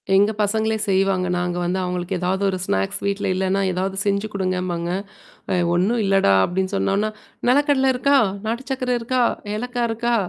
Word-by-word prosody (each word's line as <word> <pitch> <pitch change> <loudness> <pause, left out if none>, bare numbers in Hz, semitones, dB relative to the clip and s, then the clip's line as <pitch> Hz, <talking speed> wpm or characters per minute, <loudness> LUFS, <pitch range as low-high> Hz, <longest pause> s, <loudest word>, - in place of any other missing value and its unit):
எங்க 205 +2 +4
பசங்களே 220 +1 +1
செய்வாங்க. 190 -1 +2
நாங்க 175 0 -2
வந்து 180 +2 -1
அவங்களுக்கு 180 +1 -2
ஏதாவது 185 +2 -1
ஒரு 185 - -2
ஸ்நாக்ஸ் 95 - -1
வீட்ல 200 0 -1
இல்லன்னா 190 +1 0
ஏதாவது 190 +2 -2
செஞ்சு 200 +1 0
குடுங்கம்பாங்க. 180 -3 -2 0.6
அ - - +2 0.2
ஒண்ணும் 200 +7 +1
இல்லடா! 195 - +3
அப்டின்னு 190 +2 -2
சொன்னோனா, 200 +2 +1 0.4
நெலக்கடல 270 0 +3
இருக்கா, 280 +3 +3 0.3
நாட்டு 230 +4 -2
சர்கரை 255 -1 -1
இருக்கா? 250 +2 0 0.3
ஏலக்காய் 245 +1 -2
இருக்கா? 235 +1 0
195 Hz, 150 wpm, -22 LUFS, 185-230 Hz, 0.6 s, எங்க